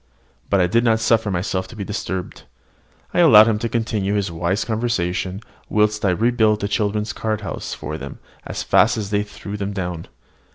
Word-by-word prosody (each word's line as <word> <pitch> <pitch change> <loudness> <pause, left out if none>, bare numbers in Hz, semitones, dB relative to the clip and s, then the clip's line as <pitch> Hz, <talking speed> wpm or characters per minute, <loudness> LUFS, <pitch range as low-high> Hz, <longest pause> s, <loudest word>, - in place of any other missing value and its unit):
But 100 - +3
I 90 - +4
did 115 +7 +2
not 115 -2 +3
suffer 110 -1 +2
myself 95 0 -2
to 105 - -12
be 105 - -4
disturbed. 95 -2 -5 0.7
I - - +1
allowed 110 -11 +8
him 110 -2 +1
to 115 - -2
continue 110 -3 -1
his 100 -3 -1
wise 85 +4 -1
conversation, 100 -4 -2 0.3
whilst 105 0 +1
I 100 - +3
rebuilt 110 +2 +2
the 100 - 0
children's 105 0 -1
card 110 -1 -2
houses 95 -5 -5
for - - -6
them - - -8 0.3
as - - -5
fast - - +4
as 105 -2 -4
they 105 -1 +2
threw 105 0 -7
them 100 0 -3
down. 90 -4 -4
105 Hz, 190 wpm, -21 LUFS, 95-110 Hz, 0.7 s, allowed